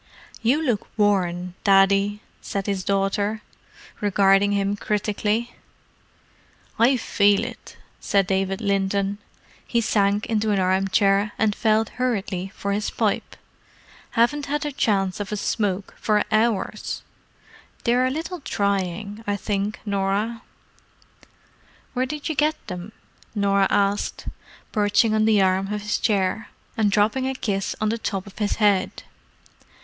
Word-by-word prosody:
"You 270 +7 +2
look 235 -7 0
worn, 180 -4 +1
Daddy," 200 +1 +4 0.2
said 195 -1 -3
his 195 -2 -2
daughter, 200 +2 0 0.6
regarding 200 0 +3
him 200 0 0
critically. 210 +3 -1 1.3
"I 250 +3 +5
feel 205 -3 +3
it," - - -10 0.2
said 200 -1 +2
David 195 +1 -1
Linton. 200 0 0 0.4
He 235 - 0
sank 205 -2 +1
into 220 -1 0
an 205 - +2
armchair 195 +2 +2
and 215 -1 +2
felt 220 -1 +2
hurriedly 195 -6 -1
for 200 - -3
his 205 +1 -1
pipe. - - -1 0.8
"Haven't 285 +5 +2
had 295 +1 -1
a 295 - -2
chance 195 -8 0
of 205 0 -4
a 210 - -1
smoke 195 -2 -1
for 210 -1 +2
hours. 215 -1 0 0.8
They're 250 +2 +3
a - - +1
little 325 +6 -4
trying, 200 - -2
I 205 - +1
think, 200 +1 -2
Norah." 200 +3 -1 1.5
"Where 255 0 0
did 300 +1 -5
you 315 - -1
get 300 +2 +2
them?" 180 +1 -7 0.4
Norah 200 -1 +3
asked, 200 0 0 0.4
perching 210 +1 +2
on 215 0 +3
the 215 -3 +4
arm 190 +1 +1
of 210 -1 -3
his 210 - -1
chair, 205 0 0 0.3
and 215 -2 +2
dropping 215 +6 +2
a 265 - -2
kiss 195 -6 -2
on 215 - +1
the 230 +1 -2
top 195 -3 -3
of 200 +1 -13
his 205 -1 0
head. 205 -4 +1
205 Hz, 135 wpm, -23 LUFS, 195-220 Hz, 1.5 s, I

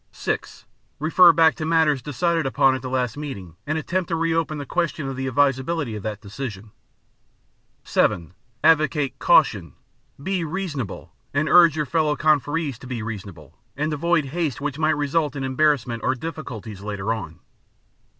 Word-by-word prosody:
(6) - - -4 0.3
Refer 170 +4 +6
back 160 0 +5
to 155 - -6
matters 155 -4 +2
decided 165 +3 0
upon 135 0 +3
at 130 - -3
the 130 - -5
last 125 -1 -1
meeting 100 - -7
and 155 +2 0
attempt 175 +3 -2
to 165 - -1
re 165 0 0
open 160 -2 -1
the 145 - -5
question 165 -1 -2
of 135 - -4
the 130 +1 -3
advisability 135 0 0
of 105 - -6
that 105 0 -5
decision. 105 -1 -7 1.1
(7) 85 -1 0 0.3
Advocate 155 -3 +3
"caution." - - +3 0.5
Be 190 0 -1
"reasonable" 155 - -5 0.2
and 145 +2 +1
urge 170 -3 +6
your 150 -1 -1
fellow 150 +1 +1
conferees 150 -3 +1
to - - -11
be 120 -4 -4
"reasonable" 100 - -8 0.2
and 150 +2 -1
avoid 160 0 +1
haste 155 0 -2
which 145 0 -4
might 155 -1 +2
result 145 0 0
in 135 - -3
embarrassments 130 -4 +1
or 130 - +1
difficulties 120 - -7
later 105 +1 -2
on. 85 -8 -7
145 Hz, 160 wpm, -23 LUFS, 125-160 Hz, 1.1 s, Refer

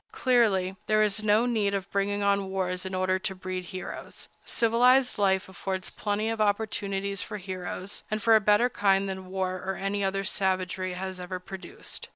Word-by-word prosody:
Clearly, 200 -7 +2
there 215 0 +4
is 215 0 +2
no 215 +2 +4
need 215 -5 +1
of 195 -1 -3
bringing 200 +1 0
on 200 -1 +2
wars 185 -1 -2
in 190 - -4
order 185 0 +1
to 190 0 -3
breed 185 -1 -5
heroes. 185 +1 -7 0.2
Civilized 245 +2 +4
life 190 -2 +2
affords 190 0 -4
plenty 210 +1 -1
of 225 -1 -1
opportunities 200 -2 0
for 210 - -5
heroes, 185 0 -6
and 215 - -1
for 225 +1 +5
a 220 - +5
better 210 +4 +4
kind 195 -4 +2
than 190 -1 -5
war 185 0 -2
or 190 0 -2
any 200 +1 -2
other 195 0 0
savagery 185 -1 -1
has 185 0 -5
ever 180 +1 -5
produced. 180 -1 -6
195 Hz, 180 wpm, -28 LUFS, 185-210 Hz, 0.2 s, for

